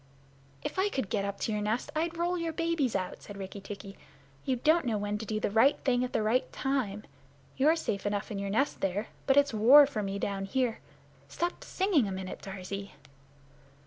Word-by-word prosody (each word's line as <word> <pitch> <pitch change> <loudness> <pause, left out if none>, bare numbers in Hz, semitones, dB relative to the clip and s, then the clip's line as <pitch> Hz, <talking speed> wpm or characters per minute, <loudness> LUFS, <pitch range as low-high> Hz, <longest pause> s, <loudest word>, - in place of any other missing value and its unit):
"If - - -3
I 400 +2 +3
could 260 - -3
get 200 -4 0
up 200 0 -4
to - - 0
your 210 -1 -1
nest, 220 +7 -1
I'd 330 +2 -1
roll 345 +1 0
your 335 -2 -2
babies 330 -7 0
out!" 185 -2 -3
said 205 - -10
Rikki 195 +1 -7
tikki. 200 0 -9 0.5
"You 260 - +1
don't 310 +3 +3
know 220 -2 +1
when 205 0 -2
to 220 - -6
do 215 0 -1
the 210 - -1
right 230 +7 +5
thing 250 -2 +2
at 250 - -3
the - - 0
right 230 +4 +1
time. 245 -7 -1 0.5
You're 300 +5 +4
safe 205 -11 -2
enough 205 0 -2
in 200 - -3
your 200 0 -3
nest 275 +8 0
there, 195 +3 -1 0.2
but 270 0 +4
it's 285 -3 +4
war 255 +7 +8
for 275 -6 -3
me 195 -1 -3
down 195 -1 -2
here. 245 +2 0 0.5
Stop 345 +1 -3
singing 370 - +1
a - - -3
minute, 190 0 -6
Darzee." 195 +1 -6
220 Hz, 210 wpm, -30 LUFS, 200-285 Hz, 0.5 s, war